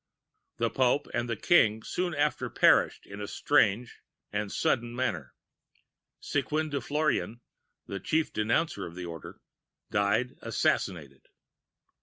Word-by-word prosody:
] - - -52
"The 115 -1 0
Pope 130 +4 +2
and 120 0 -1
the 115 - 0
King 110 -6 +3
soon 175 -2 -2
after 145 +1 0
perished - - +3
in 100 +1 -9
a 105 - -4
strange 110 +5 +1 0.3
and 105 -1 -2
sudden 120 0 0
manner. 110 - -2 0.8
Squin 150 +2 -1
de 140 -1 -1
Florian, 145 -4 -1 0.5
the 100 - -5
chief 160 - 0
denouncer 110 - 0
of 85 - -11
the 90 -1 -6
Order, 85 -2 -9 0.5
died 100 +5 +1
assassinated. 70 -7 -1
115 Hz, 130 wpm, -29 LUFS, 100-145 Hz, 0.8 s, King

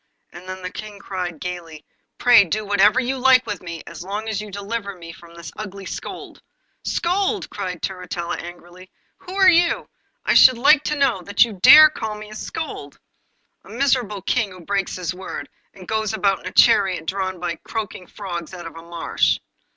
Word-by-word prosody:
And 180 +2 -11
then 185 0 -7
the 180 - -5
King 210 -1 -8
cried 180 -4 -5
gaily: 170 -4 -7 0.3
'Pray 240 -4 +7
do 210 +5 -2
whatever 205 +4 +4
you 260 +1 -2
like 255 0 +5
with 205 - -5
me, 170 -2 -7
as - - -9
long 205 +4 -5
as 215 -2 -2
you 210 - -8
deliver 200 +1 -5
me 165 -2 -10
from 170 0 -16
this 170 -1 -9
ugly 200 -2 -8
scold!' - - -8 0.4
'Scold!' 385 +4 -1
cried 185 -4 -5
Turritella 180 -2 -4
angrily. 175 +1 -11 0.3
'Who 370 +1 -10
are 385 -1 +5
you, 345 -1 +4 0.4
I - - +3
should 255 -2 +7
like 290 +4 +5
to 300 - 0
know, 265 -9 +1
that 200 +5 +3
you 230 - -8
dare 305 +11 +9
to - - -20
call 220 -1 -3
me 210 0 -10
a - - -9
scold? 215 - -6 0.7
A - - -17
miserable 235 -5 0
King 230 -1 0
who 185 -2 -13
breaks 195 +2 -2
his 180 -1 -3
word, 185 +1 -7 0.3
and 185 -2 -13
goes 220 -1 -1
about 195 -3 +1
in - - -9
a - - -5
chariot 185 -5 +4
drawn 185 0 -3
by 170 -1 -3
croaking 210 -5 -6
frogs 175 -4 -7
out 175 - -9
of 165 -1 -9
a 165 - -9
marsh! 170 0 0
200 Hz, 195 wpm, -21 LUFS, 180-230 Hz, 0.7 s, dare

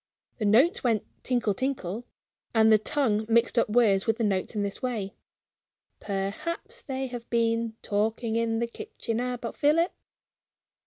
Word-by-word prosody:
The 215 - 0
notes 245 - +4
went 225 -5 +1 0.2
tinkle, 240 -5 +1
tinkle 240 -2 -3 0.5
and 220 0 +6
the 215 - +6
tongue 220 -3 +1
mixed 235 +1 +3
up 230 - +1
words 210 -4 +3
with 225 0 +2
the 235 - -1
notes 195 0 0
in 205 - 0
this 200 0 -4
way: 220 -6 -2 0.9
"Perhaps 275 - -4
they 265 -1 -3
have 245 -2 -7
been 230 -1 +1
talking 220 +2 0
in 230 0 +1
the 235 - +1
kitchen 230 0 -5
about 245 -2 -3
Philip?" 320 +4 +3
230 Hz, 150 wpm, -27 LUFS, 215-250 Hz, 0.9 s, and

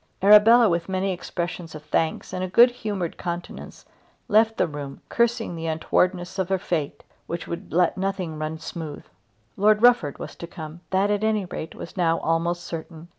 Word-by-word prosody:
Arabella, 215 +4 +8
with 170 -1 -1
many 190 +1 0
expressions 175 -2 -5
of 155 - -9
thanks 160 +1 -1
and 185 - -2
a - - -1
good 235 +7 +6
humoured 205 -8 -4
countenance, 175 0 -6 0.4
left 220 +1 +3
the - - +3
room, 145 -3 -7
cursing 235 -5 0
the 165 0 -4
untowardness 175 +3 0
of 190 -1 -1
her 190 - +2
fate 160 -5 -3 0.2
which 170 0 -5
would 170 - -6
let 175 +2 +2
nothing 185 -5 -3
run 155 +1 -3
smooth. 160 -1 -7 0.5
Lord 210 +2 +3
Rufford 240 - +4
was - - -8
to 170 - -7
come. 160 -1 -9
That 195 +2 +2
at 205 0 0
any 215 -2 +1
rate 160 -2 -7
was - - -9
now 165 -2 +2
almost 170 +2 0
certain. 165 0 -8
175 Hz, 175 wpm, -24 LUFS, 165-205 Hz, 0.5 s, Arabella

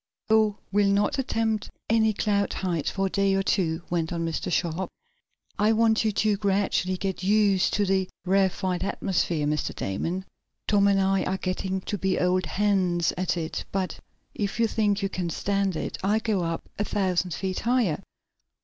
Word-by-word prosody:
"Oh, 215 -2 +4
we'll 200 0 +3
not 205 +6 +1
attempt 225 -4 -1 0.2
any 220 -1 +3
cloud 200 -1 0
heights 175 -5 -1
for 195 -1 -1
a - - 0
day 195 -1 +2
or 195 - +1
two," 170 -4 0
went 165 -1 0
on 165 -1 -2
Mr. 165 +2 -3
Sharp. 175 +1 -1 0.7
"I 215 +2 +4
want 225 0 +3
you, 220 - +2
to 210 0 +1
gradually 195 -2 0
get 190 -1 -3
used 200 -1 +3
to 205 - +2
the 190 -1 +1 0.2
rarefied 190 -1 +1
atmosphere, 175 -6 0
Mr. 150 0 -1
Damon. 170 - -3 0.4
Tom 200 -1 +4
and 200 -1 +3
I 195 0 +2
are 190 - -1
getting 190 0 -2
to 205 +2 -4
be 190 0 +1
old 185 0 +1
hands 185 -4 +1
at 185 0 -1
it. 160 -1 -3
But, 190 -1 -2 0.3
if 205 +1 -3
you 230 - +4
think 210 -2 +1
you - - +2
can 180 -3 -3
stand 195 +2 0
it, - - -4
I'll 210 +3 +2
go 215 -4 0
up 165 -1 -3
about - - +1
a - - -5
thousand 185 -3 0
feet 190 -1 -3
higher." 230 -9 +1
195 Hz, 180 wpm, -26 LUFS, 180-205 Hz, 0.7 s, Oh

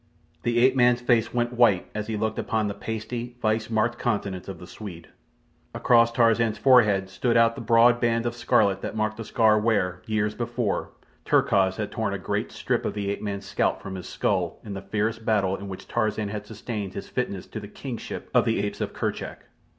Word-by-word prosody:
The 120 +4 0
ape 130 +2 +5
man's 125 -1 +4
face 120 -2 +2
went 120 0 -1
white 115 -6 +4
as 105 0 -4
he 110 -1 -2
looked 110 +1 -1
upon 110 -2 0
the 100 - -2
pasty, 115 +3 -5
vice 110 -1 0
marked 115 +2 0
countenance 100 -5 -2
of 95 -3 -6
the 90 - -11
Swede. 90 -3 -9 0.7
Across 115 -1 +4
Tarzan's 115 -1 +3
forehead 110 -8 +4
stood 115 +5 0
out 115 0 +5
the - - -8
broad 120 +1 +5
band 115 -1 +1
of 120 - -1
scarlet 100 -4 +2
that - - -5
marked 110 0 -1
the 115 - -5
scar 110 0 +3
where, 90 -5 0
years 105 -1 0
before, 120 -2 -2 0.3
Terkoz 95 -1 +3
had - - -3
torn - - -2
a - - -2
great - - -3
strip - - -1
of - - -3
the 100 -1 -2
ape - - -4
man's 100 -1 -4
scalp 100 - 0
from 95 - -6
his 90 -1 -7
skull 90 -4 -1
in 105 - -6
the 100 - -5
fierce 105 +3 -1
battle 105 -4 +1
in 100 +1 -8
which 95 -1 -8
Tarzan 110 -2 -1
had 105 0 -6
sustained 105 -3 -5
his 100 - -6
fitness 100 -7 -3
to 110 - -7
the 105 - -8
kingship 120 +3 -7
of - - +4
the - - +1
apes - - -4
of - - -3
Kerchak. - - -4
110 Hz, 205 wpm, -25 LUFS, 100-115 Hz, 0.7 s, ape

